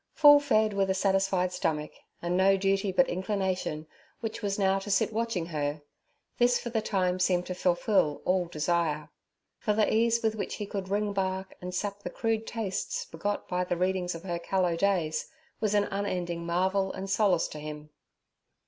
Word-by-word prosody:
Full 290 Hz, -1 st, +8 dB
fed, 215 Hz, -7 st, +2 dB
with 195 Hz, -1 st, +1 dB
a 190 Hz, -, +2 dB
satisfied 190 Hz, -1 st, +1 dB
stomach, 155 Hz, -4 st, -1 dB, 0.3 s
and 175 Hz, +1 st, 0 dB
no 195 Hz, +1 st, +4 dB
duty 195 Hz, +1 st, +1 dB
but 265 Hz, +8 st, +4 dB
inclination, 185 Hz, -4 st, -2 dB, 0.3 s
which 225 Hz, -1 st, -5 dB
was 200 Hz, -2 st, -1 dB
now 195 Hz, -1 st, +2 dB
to 195 Hz, -, -8 dB
sit 195 Hz, +2 st, +2 dB
watching 225 Hz, -6 st, -1 dB
her—this 155 Hz, +10 st, -2 dB
for 235 Hz, -, -6 dB
the 225 Hz, -1 st, 0 dB
time 185 Hz, -4 st, 0 dB
seemed 180 Hz, -1 st, +2 dB
to 185 Hz, -, -4 dB
fulfil 180 Hz, -3 st, +1 dB
all 180 Hz, -1 st, +2 dB
desire. 155 Hz, -1 st, -1 dB, 0.5 s
For 210 Hz, -, +1 dB
the 215 Hz, 0 st, +2 dB
ease 230 Hz, +1 st, +2 dB
with 220 Hz, -1 st, +2 dB
which 215 Hz, -, -4 dB
he 210 Hz, -, -4 dB
could 195 Hz, -2 st, -5 dB
ring 205 Hz, +1 st, 0 dB
bark 190 Hz, -1 st, -2 dB
and 180 Hz, 0 st, -5 dB
sap 200 Hz, +1 st, -3 dB
the 180 Hz, -, -5 dB
crude 225 Hz, +3 st, -1 dB
tastes 215 Hz, -5 st, -3 dB
begot 200 Hz, +5 st, -3 dB
by 180 Hz, -1 st, 0 dB
the 175 Hz, -1 st, -2 dB
readings 180 Hz, -1 st, 0 dB
of 165 Hz, -, -8 dB
her 175 Hz, -2 st, -3 dB
callow 180 Hz, -1 st, 0 dB
days 170 Hz, -4 st, 0 dB, 0.3 s
was 210 Hz, -1 st, +1 dB
an 205 Hz, -, +4 dB
unending 180 Hz, -4 st, -2 dB
marvel 190 Hz, +3 st, +1 dB
and 190 Hz, +1 st, -6 dB
solace 195 Hz, -3 st, +2 dB
to 150 Hz, -, -8 dB
him. 150 Hz, 0 st, -8 dB
190 Hz, 180 wpm, -29 LUFS, 175-205 Hz, 0.5 s, Full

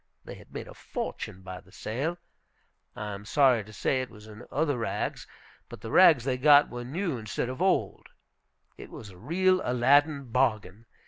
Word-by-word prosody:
They -, -, -8 dB
had -, -, -15 dB
made -, -, -7 dB
a -, -, -11 dB
fortune 95 Hz, -, -6 dB
by 95 Hz, 0 st, -8 dB
the -, -, -22 dB
sale, 140 Hz, +11 st, -3 dB, 0.8 s
I 105 Hz, -1 st, -5 dB
am 100 Hz, 0 st, -8 dB
sorry 125 Hz, -1 st, +3 dB
to 105 Hz, -, -14 dB
say 130 Hz, +4 st, 0 dB
it 130 Hz, -, -6 dB
was 105 Hz, 0 st, -14 dB
in 110 Hz, +2 st, -12 dB
other 145 Hz, -3 st, 0 dB
rags, 115 Hz, -, -3 dB, 0.4 s
but -, -, -11 dB
the 110 Hz, -, -7 dB
rags 165 Hz, -9 st, +6 dB
they 130 Hz, 0 st, -1 dB
got 145 Hz, +1 st, +6 dB
were 120 Hz, 0 st, -6 dB
new 155 Hz, +1 st, -3 dB
instead 110 Hz, +2 st, -3 dB
of 130 Hz, +6 st, -6 dB
old, 190 Hz, 0 st, 0 dB, 0.7 s
it -, -, -10 dB
was 105 Hz, -, -10 dB
a 90 Hz, -, -15 dB
real 185 Hz, -, +2 dB
Aladdin 140 Hz, +2 st, +2 dB
bargain. 110 Hz, -4 st, 0 dB
125 Hz, 185 wpm, -28 LUFS, 110-145 Hz, 0.8 s, rags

